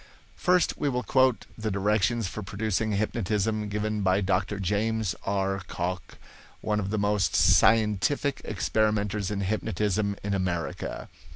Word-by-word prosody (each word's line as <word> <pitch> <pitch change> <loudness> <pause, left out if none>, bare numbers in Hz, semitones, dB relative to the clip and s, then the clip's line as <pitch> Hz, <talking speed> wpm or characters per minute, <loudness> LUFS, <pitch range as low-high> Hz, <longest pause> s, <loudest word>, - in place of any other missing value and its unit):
First 180 0 +2
we 145 - +1
will 125 -1 -1
quote 130 -2 +2
the 110 -1 -3
directions 105 +2 +1
for 105 - -6
producing 105 +2 -1
hypnotism 105 0 -1
given 105 +1 -2
by 95 0 +3
Dr. 95 +1 0
James 105 +2 0
R. 95 -1 0
Cocke, 90 -1 -4 0.4
one 105 0 -1
of 100 -2 -3
the 110 - -1
most 105 -2 +1
scientific 115 +6 +3
experimenters 105 -1 0
in 100 -1 -2
hypnotism 105 0 -1
in 100 0 -1
America. 90 -3 -3
105 Hz, 130 wpm, -27 LUFS, 100-110 Hz, 0.4 s, by